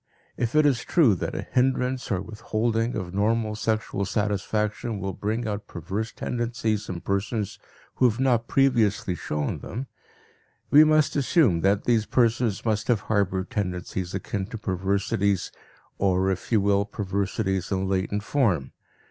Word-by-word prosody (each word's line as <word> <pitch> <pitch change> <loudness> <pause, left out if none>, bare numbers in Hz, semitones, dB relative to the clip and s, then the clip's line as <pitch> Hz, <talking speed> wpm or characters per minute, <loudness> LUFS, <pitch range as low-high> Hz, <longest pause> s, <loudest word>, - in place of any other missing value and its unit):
If 120 +3 -2
it 155 0 +5
is 135 -5 +2
true 145 - +4
that 90 - -3
a - - -3
hindrance 130 0 +1
or 95 -4 -1
withholding 115 +2 -1
of 95 -4 -4
normal 110 +2 +1
sexual 110 -2 -1
satisfaction 105 +2 -1
will 95 0 -3
bring 110 +5 -2
out 105 0 -4
perverse 95 +7 -4
tendencies 115 -3 -2
in 85 -2 -4
persons 100 +1 -2 0.4
who 125 - +5
have 115 +2 -4
not 120 -3 +2
previously 115 -8 +2
shown 75 -3 -3
them, 125 +4 -5 0.9
we 150 +2 +9
must 155 -1 +3
assume 135 - +3
that 100 +2 +2
these 115 -3 +2
persons 115 -3 +1
must 110 -2 0
have 120 -4 +2
harbored 95 -3 0
tendencies 90 -2 -3
akin 95 0 -3
to 115 - -6
perversities 100 0 0 0.5
or, 95 0 +2
if 95 - -5
you 110 -3 +4
will, 100 0 +3
perversities 100 -1 -2
in 95 0 0
latent 95 +2 -1
form. 100 - +1
105 Hz, 150 wpm, -25 LUFS, 95-115 Hz, 0.9 s, we